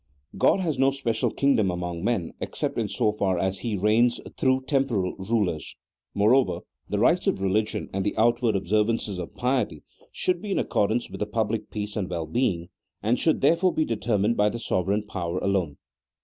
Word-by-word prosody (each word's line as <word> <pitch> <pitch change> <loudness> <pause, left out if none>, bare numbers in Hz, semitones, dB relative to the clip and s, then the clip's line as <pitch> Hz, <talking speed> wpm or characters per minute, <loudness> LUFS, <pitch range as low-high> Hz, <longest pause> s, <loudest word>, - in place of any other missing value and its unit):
God 195 - +3
has 160 -7 -1
no 135 0 +5
special 125 -5 -1
kingdom 135 -8 +2
among 90 -1 -4
men 100 -7 -1
except - - -3
in - - 0
so 105 - +1
far 100 -3 0
as 95 +2 -1
He 115 -4 -2
reigns 110 +5 +3 0.2
through 130 0 +2
temporal 130 -11 0
rulers. 95 -6 -1 0.4
Moreover, 120 +6 +3 0.3
the - - -1
rites - - +3
of - - +1
re 95 -1 0
ligion 105 +1 0
and 95 0 -1
the 100 - -2
outward 115 0 +3
observances 105 +1 0
of 85 - -7
piety 125 - -1 0.3
should 180 -1 0
be 210 - -6
in 195 - 0
accordance 110 +4 0
with - - -7
the 105 - -1
public 110 0 -2
peace 105 -1 -5
and 100 -4 -2
well 85 -2 -3
being, 85 -2 -1 0.3
and 115 +4 +2
should 160 - +2
therefore 170 +6 +3
be 155 - +2
determined 110 0 0
by 105 0 +4
the 120 - -4
sovereign 100 -1 0
power 90 -4 -3
alone. 95 -7 0
105 Hz, 185 wpm, -25 LUFS, 95-120 Hz, 0.4 s, no